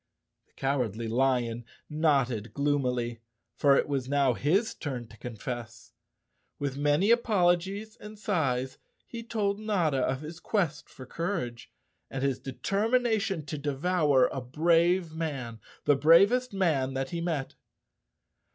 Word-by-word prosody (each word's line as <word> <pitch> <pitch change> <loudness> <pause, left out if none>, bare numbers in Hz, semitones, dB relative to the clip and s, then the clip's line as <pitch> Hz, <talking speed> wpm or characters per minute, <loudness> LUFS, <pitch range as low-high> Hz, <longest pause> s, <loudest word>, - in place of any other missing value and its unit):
The - - -37
Cowardly 120 -5 -1
Lion 120 -1 +1 0.2
nodded 135 -8 0
gloomily, 125 -5 0 0.3
for 140 -1 +4
it - - +1
was 135 -3 -2
now 140 -3 +3
his 185 - +1
turn 125 -5 -5
to 110 - -15
confess. 120 0 -7 0.7
With 140 -2 -3
many 145 +9 +2
apologies 205 -1 +1
and 210 0 -11
sighs 135 -11 -1 0.3
he 235 - -7
told 210 -3 -1
Notta 180 -10 +1
of 130 +1 0
his 160 +2 -8
quest 165 -9 -1
for 130 - -11
courage 130 -7 -4 0.4
and 135 0 -4
his 135 -2 0
determina¬ 220 - 0
tion 190 -8 -3
to 150 0 -5
devour 145 -1 +2
a 135 - -4
brave 165 +5 +2
man, 135 -8 -4 0.3
the 145 - +5
bravest 195 - +5
man 155 -9 0
that 135 0 -2
he 170 - -3
met. 160 -6 -2
145 Hz, 135 wpm, -28 LUFS, 130-180 Hz, 0.7 s, the